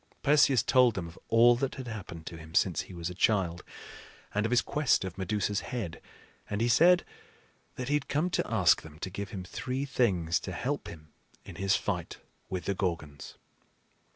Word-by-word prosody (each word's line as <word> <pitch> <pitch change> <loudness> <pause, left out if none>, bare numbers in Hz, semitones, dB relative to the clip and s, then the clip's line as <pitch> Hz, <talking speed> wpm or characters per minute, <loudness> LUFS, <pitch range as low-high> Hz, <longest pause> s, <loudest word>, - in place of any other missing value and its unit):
Perseus 140 -4 +5
told 125 -4 +4
them 90 -3 -3
of 85 - -13
all 120 +1 +6
that 135 +1 -2
had 130 -2 -7
happened 95 -7 -7
to 85 - -7
him 80 0 -11
since 90 -6 +2
he - - -11
was 85 +1 -4
a - - -6
child, 90 -3 +1 0.7
and 105 +2 +1
of - - -6
his 125 - +4
quest 145 -9 +1
of 95 - -6
Medusa's 100 +2 -1
head; 100 -10 -5 0.5
and 105 - -2
he 115 - +2
said 170 +9 +5 0.7
that 125 - -5
he 145 - 0
had 145 -1 0
come 150 +5 +1
to - - -1
ask 95 -7 +4
them 75 -1 -13
to 95 +3 -5
give 100 +1 -5
him 95 -1 -6
three 130 +8 -4
things 95 - +1
to - - -6
help - - -3
him 75 -2 -11 0.4
in - - -10
his 95 0 +2
fight - - -3 0.3
with 95 -2 -4
the 100 - 0
Gorgons. 85 -7 -4
100 Hz, 195 wpm, -29 LUFS, 85-125 Hz, 0.7 s, all